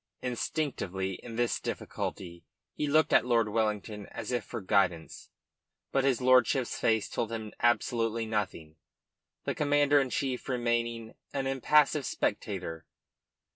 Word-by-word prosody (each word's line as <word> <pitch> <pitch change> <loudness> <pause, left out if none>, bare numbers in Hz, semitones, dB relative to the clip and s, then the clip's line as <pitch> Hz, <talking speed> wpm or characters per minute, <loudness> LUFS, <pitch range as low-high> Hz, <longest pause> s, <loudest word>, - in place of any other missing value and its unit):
Instinctively 120 - -2
in 115 -2 -8
this 120 0 +1
difficulty 85 -2 -5 0.3
he 150 - -2
looked 155 +2 +3
at - - +6
Lord 115 -3 +2
Wellington 105 -1 -2
as - - -6
if 120 -3 0
for 115 - -6
guidance; 95 -4 0 0.6
but 135 - +2
his 135 -3 +2
lordship's 130 0 +3
face 110 -2 +2
told 115 - -3
him 110 -2 -5
absolutely 115 -1 +1
nothing, 95 -8 -3 0.7
the - - -1
Commander 145 0 +3
in 135 -2 0
Chief 130 0 -2
remaining 120 -2 -1 0.2
an 135 -1 -1
impassive 140 +1 +3
spectator. 95 -6 -3
115 Hz, 130 wpm, -30 LUFS, 105-130 Hz, 0.7 s, at